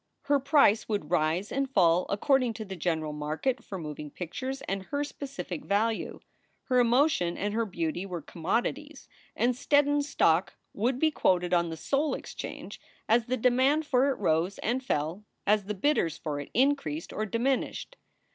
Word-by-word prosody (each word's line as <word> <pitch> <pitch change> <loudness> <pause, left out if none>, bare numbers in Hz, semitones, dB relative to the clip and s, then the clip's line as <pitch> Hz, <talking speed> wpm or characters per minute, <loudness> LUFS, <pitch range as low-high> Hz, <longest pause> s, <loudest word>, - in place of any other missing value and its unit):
Her 285 0 +2
price 275 -7 +4
would 200 -8 -2
rise 170 +4 +1
and 275 0 -1
fall 180 -7 +3
according 250 +3 +2
to 220 - -6
the 190 -1 -6
general 160 -3 -1
market 155 - -2
for 195 - -6
moving 150 -3 -6
pictures 260 - -5
and 195 0 -3
her 285 0 -1
specific 275 - -6
value. 220 +3 0 0.4
Her 250 -1 +2
emotion 240 - +3
and 205 +1 -2
her 225 0 0
beauty 175 0 -3
were 175 -5 -5
commodities, 245 - -3 0.3
and 245 +1 +2
Steddon 290 +2 +2
stock 195 - +2 0.2
would 240 +5 0
be 315 +3 +2
quoted 180 -9 +1
on 170 -1 +2
the 160 - -6
Soul 280 - 0
Exchange - - -8 0.3
as 230 +1 +3
the 255 +1 0
demand 260 +6 +3
for 265 0 +3
it 270 - 0
rose 175 0 +1
and 250 +4 0
fell, 165 - -2 0.2
as 210 -1 +3
the 210 +1 -3
bidders 185 - +1
for 150 -2 -4
it 145 - -7
increased 245 - +1
or 215 +1 -2
diminished. 255 - -1
215 Hz, 165 wpm, -28 LUFS, 175-270 Hz, 0.4 s, price